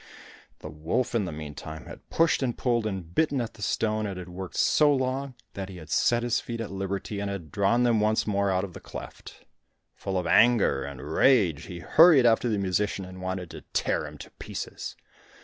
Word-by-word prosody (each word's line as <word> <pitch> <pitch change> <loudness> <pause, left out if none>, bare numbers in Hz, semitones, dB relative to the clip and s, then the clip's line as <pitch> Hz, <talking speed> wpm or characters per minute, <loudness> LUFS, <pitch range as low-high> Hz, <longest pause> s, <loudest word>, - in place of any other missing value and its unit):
The - - -7
wolf, 80 +12 -2
in 115 -4 +1
the 90 - -4
meantime, 75 +1 -8
had - - -12
pushed 165 -2 +2
and 125 -3 -1
pulled 120 -3 +1
and 95 -5 -5
bitten 150 - +2
at 115 -2 -3
the 110 - -15
stone, 110 0 0
and 95 -2 -5
had 90 -1 -8
worked 90 +1 -7
so 150 -1 +4
long 130 0 -1 0.2
that 95 -1 -5
he 95 - -9
had 80 - -11
set 120 0 +2
his 120 -1 +1
feet 115 -1 -6
at 115 -3 -4
liberty 95 +1 -3
and 100 0 -2
had 90 -6 -6
drawn 110 +5 +2
them 120 -3 +3
once 110 +1 +2
more 100 -1 +1
out 95 0 +1
of 95 -3 -6
the - - -9
cleft. - - -10 0.5
Full 95 -1 -3
of 90 - -1
anger 115 +6 +4
and 70 -2 -7
rage 95 - +3
he 90 -3 -8
hurried 155 - +6
after 120 +1 +4
the 105 - +1
musician 100 0 -1
and 95 0 -10
wanted 95 -2 -4
to - - -9
tear - - 0
him - - -10
to - - -11
pieces. - - -6
100 Hz, 210 wpm, -27 LUFS, 90-120 Hz, 0.5 s, hurried